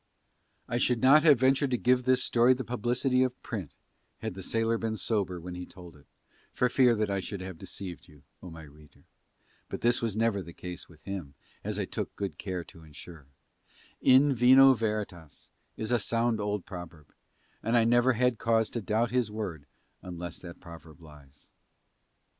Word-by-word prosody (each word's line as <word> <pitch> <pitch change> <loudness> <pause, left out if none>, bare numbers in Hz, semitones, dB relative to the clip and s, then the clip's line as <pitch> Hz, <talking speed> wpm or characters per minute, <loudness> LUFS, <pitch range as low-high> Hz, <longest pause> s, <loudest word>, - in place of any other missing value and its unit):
I 120 -1 -1
should 120 -1 +1
not 135 +5 +6
have 150 -6 +5
ventured 135 +2 +3
to 125 - 0
give 125 +1 +2
this 130 0 +3
story 120 +2 +4
the 130 - -5
publicity 125 +2 0
of 130 -1 0
print 95 - -6 0.4
had - - -5
the 95 - -8
sailor 115 +3 0
been 110 -1 -2
sober 100 -5 -1
when 90 +2 -8
he 90 0 -6
told 90 -3 -13
it, 75 -1 -20 0.4
for 125 - +1
fear 125 -2 +4
that 110 -1 -1
he - - -1
I 100 - 0
should 95 +1 -5
have 95 -3 -8
deceived 95 -1 -7
you, 75 -4 -19 0.2
O 90 - -9
my 80 -1 -10
reader; 75 0 -18 0.7
but - - -6
this 120 +1 +2
was 110 -3 -2
never 110 -3 +1
the 85 -1 -10
case 90 -1 -8
with 80 -2 -19
him 90 -8 -6 0.3
as - - -3
I - - -1
took - - -5
good 95 -7 -5
care 90 -3 -4
to 85 - -16
ensure: 75 -1 -13 0.7
"in 135 +2 +5
vino 130 +2 +7
veritas" 105 - -5 0.3
is 110 +1 -4
a 120 - +3
sound 115 +2 0
old 105 -2 -2
proverb, 85 -5 -10 0.5
and 115 +2 +1
I 115 - +5
never 120 +2 +4
had 125 0 +1
cause 115 -1 +1
to 115 - -3
doubt 110 +4 0
his 125 -3 +1
word 95 -9 -6 0.3
unless 85 -2 -7
that 85 -1 -11
proverb 85 -1 -13
lies. 75 -3 -17
105 Hz, 190 wpm, -29 LUFS, 85-120 Hz, 0.7 s, vino